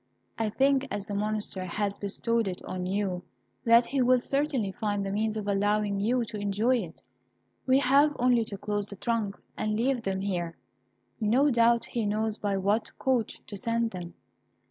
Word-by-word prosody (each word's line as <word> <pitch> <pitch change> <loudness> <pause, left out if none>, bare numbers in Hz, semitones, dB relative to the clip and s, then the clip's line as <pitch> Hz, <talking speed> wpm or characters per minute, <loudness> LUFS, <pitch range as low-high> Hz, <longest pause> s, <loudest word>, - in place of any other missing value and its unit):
I 225 -1 +1
think, 270 +4 +2
as 205 -1 -4
the 205 - -6
Monster 210 -2 -2
has 200 +2 -2
bestowed 225 +2 0
it 180 -1 -3
on 180 -1 -4
you, 190 -2 -1 0.4
that 235 +1 +6
he 270 +2 0
will 250 0 +5
certainly 275 -5 0
find 205 -2 -2
the 195 - -2
means 215 +2 0
of 210 -1 -4
allowing 205 0 +1
you 235 +4 +1
to 215 -1 -6
enjoy 205 +5 +2
it. 175 -8 -7 0.6
We 260 0 +5
have 280 +2 +4
only 245 -1 +3
to 200 - -6
close 205 0 -2
the 200 - -8
trunks, 215 -1 -2
and 215 0 -1
leave 255 0 +1
them 195 -3 -2
here. 175 -4 -2 0.6
No 250 +7 +3
doubt 235 -1 +4
he 230 -3 -2
knows 215 +1 -1
by 200 -1 0
what 205 +3 0
coach 255 -5 0
to 205 - -8
send 230 +2 0
them." 175 -2 -7
215 Hz, 180 wpm, -28 LUFS, 200-235 Hz, 0.6 s, that